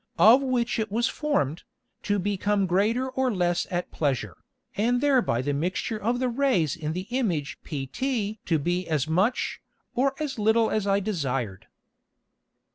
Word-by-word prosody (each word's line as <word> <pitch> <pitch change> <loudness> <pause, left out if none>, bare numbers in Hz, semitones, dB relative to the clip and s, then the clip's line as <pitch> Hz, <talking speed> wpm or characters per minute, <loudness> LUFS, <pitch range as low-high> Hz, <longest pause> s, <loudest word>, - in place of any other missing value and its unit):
of 235 +6 +7
which 250 -3 0
it 220 -2 -2
was 235 +4 +1
formed, 225 - -1 0.4
to 205 0 0
become 200 +1 0
greater 210 +8 +1
or 260 0 0
less 175 -3 0
at 175 -2 -3
pleasure, 130 - -1 0.4
and 240 +4 +2
thereby 250 - +2
the 145 +1 -1
Mixture 185 +8 -2
of 235 +4 +1
the 255 +1 0
Rays 240 - +1
in 155 -2 -3
the 180 +2 -4
Image 180 - -1
pt 210 - -3
to 165 - +3
be 175 +4 -1
as 155 -3 0
much, 190 +10 0 0.3
or 270 +2 +1
as 290 -6 -3
little 220 +1 +3
as 215 -2 0
I 195 0 +3
desired. 135 - -3
205 Hz, 155 wpm, -26 LUFS, 165-245 Hz, 0.4 s, of